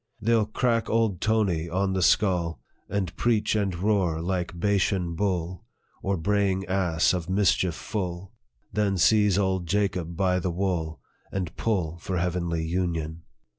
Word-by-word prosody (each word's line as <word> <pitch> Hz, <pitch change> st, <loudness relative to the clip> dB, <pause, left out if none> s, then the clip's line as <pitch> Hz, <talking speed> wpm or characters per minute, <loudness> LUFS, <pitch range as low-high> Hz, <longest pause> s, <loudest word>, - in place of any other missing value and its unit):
They 110 Hz, +2 st, 0 dB
'11 110 Hz, -2 st, +1 dB
crack 115 Hz, -3 st, +1 dB
old 110 Hz, -5 st, +1 dB
Tony 100 Hz, -7 st, +1 dB
on 95 Hz, +2 st, 0 dB
the 95 Hz, -, 0 dB
skull, 90 Hz, -3 st, +2 dB, 0.3 s
And 95 Hz, -4 st, -2 dB
preach 110 Hz, -3 st, +1 dB
and 100 Hz, -4 st, 0 dB
roar 90 Hz, -3 st, +1 dB
like 90 Hz, 0 st, -2 dB
Bashan 95 Hz, -3 st, +1 dB
bull, 90 Hz, 0 st, -2 dB, 0.4 s
Or 100 Hz, 0 st, 0 dB
braying 95 Hz, +2 st, +1 dB
ass, 90 Hz, -2 st, +2 dB
of 90 Hz, -2 st, -3 dB
mischief 95 Hz, -3 st, +2 dB
full, 95 Hz, -2 st, -4 dB, 0.4 s
Then 100 Hz, -2 st, +1 dB
seize 105 Hz, +1 st, +4 dB
old 95 Hz, -3 st, 0 dB
Jacob 90 Hz, -3 st, -1 dB
by 90 Hz, -1 st, +2 dB
the 90 Hz, -, -2 dB
wool, 85 Hz, -3 st, -2 dB, 0.3 s
And 95 Hz, -4 st, -3 dB
pull 85 Hz, -7 st, -1 dB
for 90 Hz, +2 st, -3 dB
heavenly 85 Hz, -2 st, -1 dB
union. 85 Hz, -2 st, -2 dB
95 Hz, 145 wpm, -26 LUFS, 85-100 Hz, 0.4 s, seize